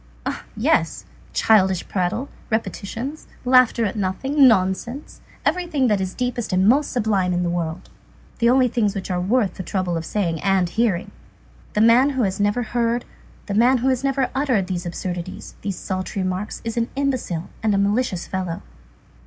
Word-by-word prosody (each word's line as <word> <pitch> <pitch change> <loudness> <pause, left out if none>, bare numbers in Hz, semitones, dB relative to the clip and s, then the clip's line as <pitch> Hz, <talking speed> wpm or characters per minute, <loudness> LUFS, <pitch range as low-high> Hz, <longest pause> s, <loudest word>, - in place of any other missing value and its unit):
eh! - - 0 0.2
yes, - - +1 0.3
childish 190 -4 +3
prattle, 190 +8 -1 0.2
repetitions, 230 +5 -3 0.2
laughter 250 -2 +5
at 205 - -2
nothing, 265 +9 +3
nonsense, 225 +6 0 0.2
everything 315 -3 +1
that 205 -2 +2
is 185 -1 -3
deepest 245 -3 -2
and 185 +1 +3
most 275 +6 +3
sublime 205 -6 +1
in 175 0 0
the 175 - 0
world! 170 0 -3 0.5
The 235 0 +4
only 255 0 +5
things 215 -4 0
which 190 -1 -4
are 180 -1 0
worth 200 0 +1
the - - -4
trouble 185 -2 -2
of 165 - -2
saying 170 -3 -1
and 195 -2 +2
hearing! 210 -3 0 0.6
The 210 - +2
man 235 +5 +6
who 265 -3 0
has 190 -1 -1
never 205 +4 +1
heard, 235 +1 0 0.4
the 205 - -4
man 245 +5 +4
who 255 +2 +1
has 260 0 0
never 270 -1 +1
uttered 260 -8 +1
these 180 -2 -3
absurdities, 175 +1 -5
these 200 -3 -3
paltry 190 0 -2
remarks, 185 +3 -3
is 230 0 -3
an 235 0 0
imbecile 255 -12 -2
and 215 -2 +2
a - - +2
malicious 200 -2 0
fellow. 185 -3 -4
210 Hz, 170 wpm, -22 LUFS, 185-250 Hz, 0.6 s, man